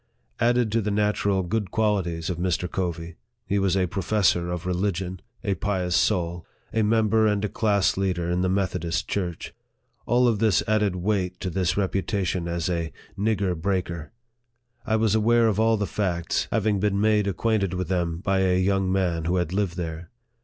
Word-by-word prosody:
Added 120 -1 +2
to 115 +1 +2
the 105 - -2
natural 100 -2 +1
good 100 +2 -2
qual 105 -2 +2
ities 85 -1 -4
of 85 - -5
Mr. 90 0 0
Covey, 85 -2 -4 0.3
he 100 0 0
was 95 -1 +1
a 95 - +2
professor 90 -1 +1
of 90 0 -4
religion 90 0 -2 0.2
a 100 -4 +1
pious 95 -3 -1
soul 85 -1 +1 0.3
a 110 - +2
member 110 0 +3
and 105 0 +1
a - - -2
class 100 -3 +1
leader 90 -3 -1
in 90 +1 0
the 95 - +1
Meth 95 0 0
odist 85 -1 -2
church. 90 -4 -3 0.5
All 120 +1 +4
of 110 -4 +1
this 110 -4 +3
added 105 -3 +2
weight 90 -1 -1
to 95 - -2
his 90 -1 +1
reputa 100 0 -1
tion 85 0 -2
as 85 -1 -2
a 85 -3 -2
" - - -27
nigger 100 -3 0
breaker." 85 -2 -2 0.8
I 110 - +2
was 110 -2 +2
aware 115 +1 +4
of 110 -1 0
all 115 0 +3
the 105 - -1
facts, 90 -5 -1
having 105 -2 +1
been 100 0 +1
made 105 -1 +3
acquainted 100 -1 0
with 90 -2 -2
them 85 -2 -1
by 95 -2 +1
a 95 -1 +2
young 95 0 +1
man 90 -4 0
who 90 +2 +1
had 90 -1 -1
lived 95 -4 -1
there. 85 -1 -5
95 Hz, 190 wpm, -25 LUFS, 90-105 Hz, 0.8 s, All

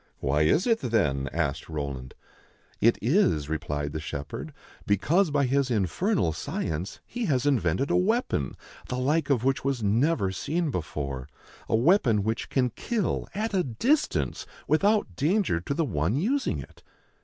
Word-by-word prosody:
"Why 70 +3 +1
is 115 - +3
it, 230 -2 +3
then?" 75 - 0
asked 80 -4 -2
Roland. 70 -5 -5 0.3
" - - -34
It 115 +1 +5
is," 115 - +2
replied 75 -2 -3
the 80 - -3
shepherd, 70 -2 -6 0.2
" - - -23
because 160 - +3
by 145 -1 +2
his 135 +1 +1
infernal 110 - +1
science 80 +4 -4
he 240 -1 -4
has 135 - +1
invented 135 - +1
a - - +3
weapon 185 - +1 0.3
the 125 - -3
like 145 +4 +1
of 125 -5 +2
which 135 0 +1
was 135 -4 -1
never 110 - +2
seen 155 - -1
before, 70 - -4 0.2
— - - -23
a - - +3
weapon 120 - +4
which 110 +3 -2
can 125 -2 +1
kill 225 - -2
at 215 +1 -2
a 185 -2 +2
distance 245 - 0 0.2
without 200 - +2
danger 165 - +1
to 140 - -3
the 165 - +1
one 85 - 0
using 245 - 0
it." - - -10
125 Hz, 165 wpm, -27 LUFS, -, 0.3 s, It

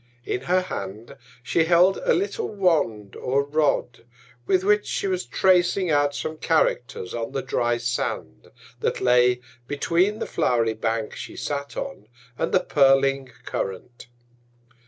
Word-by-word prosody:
In 125 - -2
her 185 +3 +3
Hand 110 - -7 0.3
she 160 +6 +2
held 180 +3 +4
a - - +2
little 410 +4 -2
Wand 150 - 0
or 135 +2 0
Rod, 145 -5 0 0.4
with 185 -1 +2
which 210 +1 +2
she - - -2
was 185 -2 -1
tracing 180 -1 +2
out 145 -1 +2
some 155 +2 -4
Characters 140 - 0
on 115 +2 -4
the 135 - -2
dry 120 0 0
Sand, 120 - -3 0.3
that - - -1
lay 125 0 +3 0.3
between 175 +8 +1
the - - -3
flow'ry 115 -2 +1
Bank 110 0 -2
she - - -8
sat 140 -1 -4
on, 275 - -6 0.3
and - - -2
the - - +3
purling 135 -1 +3 0.2
Current. 100 +7 -5
140 Hz, 140 wpm, -24 LUFS, 120-180 Hz, 0.4 s, held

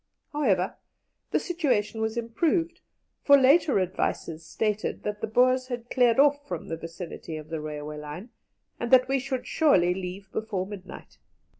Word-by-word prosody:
However, 200 -11 +1 0.5
the - - +2
situation 245 - -1
was 220 +1 -1
improved, 330 +9 0 0.4
for 280 0 +7
later 275 - +4
advices 170 -3 -2
stated 210 +5 -2
that 210 0 -4
the - - -1
Boers 255 +3 +3
had 245 -2 -6
cleared 245 -1 +3
off 285 0 +4
from 175 -3 -5
the 165 - -2
vicinity 165 -1 -7
of 155 0 -10
the 160 -2 -4
railway 150 0 -6
line, 150 +10 -8 0.5
and 235 - -3
that 255 0 +6
we 270 0 +1
should 260 -1 -3
surely 185 - +3
leave 190 +1 -7
before 205 -4 -2
midnight. 195 -2 -10
220 Hz, 155 wpm, -27 LUFS, 180-260 Hz, 0.5 s, for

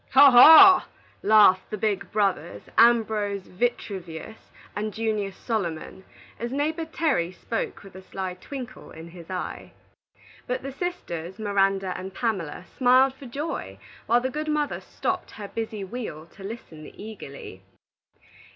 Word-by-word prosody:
"Haw! 275 +1 +9
haw!" 320 +10 +9 0.3
laughed 205 -3 +5
the 215 - -4
big 200 -2 -2
brothers, 195 - -1
Ambrose 220 -4 +3
Vitruvius 190 -3 -4 0.3
and 215 +1 -3
Junius 215 -3 -2
Solomon, 190 -4 -4 0.3
as 235 +2 -4
neighbor 310 +4 -1
Terry 300 - 0
spoke 225 +5 -5
with 195 - -14
a 190 - -10
sly 190 -1 -5
twinkle 250 +6 -9
in 165 +1 -11
his 170 0 -13
eye. 185 -1 -6 0.7
But 250 +1 -3
the 275 - -5
sisters, 200 - -5
Miranda 195 -3 +1
and 190 +1 -7
Pamela, 185 -8 -3
smiled 260 +1 +4
for 265 0 -12
joy, 235 - -5 0.3
while 240 +1 +4
the 260 +1 -2
good 305 +2 -4
mother 300 -1 -1
stopped - - -3
her 205 -2 -8
busy 220 -2 -5
wheel 190 -7 -6
to 195 - -13
listen 180 -8 -9
eagerly. 140 - -9
215 Hz, 135 wpm, -25 LUFS, 185-250 Hz, 0.7 s, Haw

